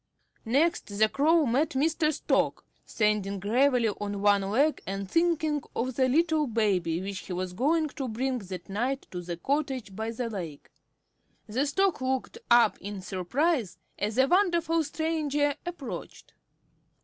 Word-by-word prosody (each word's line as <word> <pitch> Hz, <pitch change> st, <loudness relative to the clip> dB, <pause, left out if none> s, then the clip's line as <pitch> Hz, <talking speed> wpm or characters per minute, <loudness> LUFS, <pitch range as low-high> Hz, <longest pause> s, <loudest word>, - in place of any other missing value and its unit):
Next 315 Hz, +9 st, +2 dB
the 210 Hz, +1 st, +2 dB
Crow 310 Hz, +6 st, +3 dB
met 275 Hz, +6 st, +2 dB
Mr. 310 Hz, +2 st, +2 dB
Stork, 305 Hz, -, 0 dB, 0.2 s
standing 210 Hz, -2 st, 0 dB
gravely 240 Hz, +3 st, +3 dB
on 205 Hz, 0 st, -4 dB
one 205 Hz, -1 st, +5 dB
leg 255 Hz, +11 st, +1 dB
and 195 Hz, 0 st, -3 dB
thinking 315 Hz, -, +1 dB
of 255 Hz, +2 st, -1 dB
the 260 Hz, +1 st, +2 dB
little 315 Hz, +1 st, +2 dB
baby 195 Hz, -8 st, +1 dB
which 195 Hz, 0 st, -4 dB
he 185 Hz, -, -7 dB
was 180 Hz, 0 st, -3 dB
going 305 Hz, -, +2 dB
to 270 Hz, -1 st, -5 dB
bring 250 Hz, +3 st, -1 dB
that 185 Hz, -3 st, -8 dB
night 245 Hz, +7 st, -2 dB
to 180 Hz, -, -5 dB
the 175 Hz, -1 st, -5 dB
cottage 265 Hz, -, -2 dB
by 220 Hz, +2 st, -3 dB
the 235 Hz, +1 st, -3 dB
lake. 175 Hz, -10 st, -7 dB, 0.7 s
The 255 Hz, +7 st, -1 dB
Stork 380 Hz, +1 st, +1 dB
looked 260 Hz, -, -2 dB
up 235 Hz, -3 st, +5 dB
in 200 Hz, -1 st, -6 dB
surprise 215 Hz, -, -1 dB, 0.2 s
as 210 Hz, +1 st, -1 dB
the 260 Hz, +1 st, +4 dB
wonderful 340 Hz, -3 st, +2 dB
stranger 295 Hz, -2 st, 0 dB
approached. 340 Hz, -7 st, -7 dB
255 Hz, 150 wpm, -28 LUFS, 205-300 Hz, 0.7 s, one